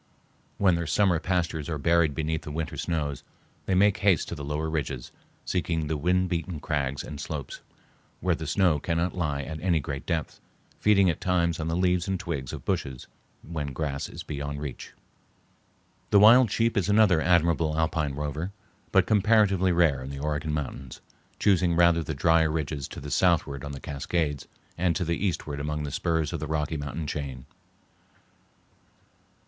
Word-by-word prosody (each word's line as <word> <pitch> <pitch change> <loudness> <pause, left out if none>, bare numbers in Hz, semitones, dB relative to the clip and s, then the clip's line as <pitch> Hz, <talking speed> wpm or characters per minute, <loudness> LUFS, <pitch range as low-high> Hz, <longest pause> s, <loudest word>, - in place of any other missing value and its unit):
When 95 -3 +4
their 85 -1 -1
summer 95 -2 +3
pastures 85 -4 -1
are 80 - -2
buried 80 0 +2
beneath 80 0 -1
the - - -8
winter 80 +1 -3
snows, 75 -2 -2 0.4
they 95 - +2
make 100 +2 +4
haste 95 -6 +2
to - - -4
the 70 - -7
lower 75 +2 -2
ridges, 70 -6 -3 0.3
seeking 85 -3 -1
the 80 +1 -1
wind 90 +5 +1
beaten 85 -1 -3
crags 70 -3 -2
and 75 -1 -7
slopes 70 -3 -6 0.6
where 90 -1 +1
the 80 -1 -4
snow 90 -4 +2
cannot 85 +3 -1
lie 75 -6 -1
at 80 +2 -6
any 90 -3 +2
great 70 -1 -5
depth, 80 -3 -2 0.4
feeding 100 -2 +4
at 80 - -8
times 85 -2 +1
on 80 - -2
the 80 - -1
leaves 90 -1 +1
and 95 -1 -1
twigs 75 -8 -4
of - - -8
bushes 65 -2 -2 0.4
when 75 -4 -4
grass 70 -2 -3
is - - -8
beyond 70 -1 -5
reach. 70 -3 -7 1.2
The - - +5
wild 115 +4 +8
sheep 115 +2 +1
is 100 0 +1
another 100 -6 +5
admirable 85 -3 +2
alpine 80 -3 0
rover, 75 +5 -3 0.4
but 95 -2 +4
comparatively 100 -3 +3
rare 85 -6 +3
in 65 - -7
the 70 - -6
Oregon 75 +2 -2
mountains, 70 -3 -5 0.4
choosing 90 -4 +3
rather 85 -1 +4
the 80 -1 -4
drier 80 +3 +3
ridges 75 -3 -3
to - - -9
the 70 +1 -7
southward 75 -4 +2
on 70 - -5
the 70 - -7
Cascades 75 +1 -2 0.3
and 90 -2 +2
to 90 - -1
the 85 +3 -1
eastward 80 -6 -2
among 75 +1 -3
the 70 - -4
spurs 80 0 -1
of 85 - -2
the 75 - -4
Rocky 80 +1 -1
Mountain 75 +2 -4
chain. 70 -4 -5
80 Hz, 175 wpm, -27 LUFS, 75-90 Hz, 1.2 s, wild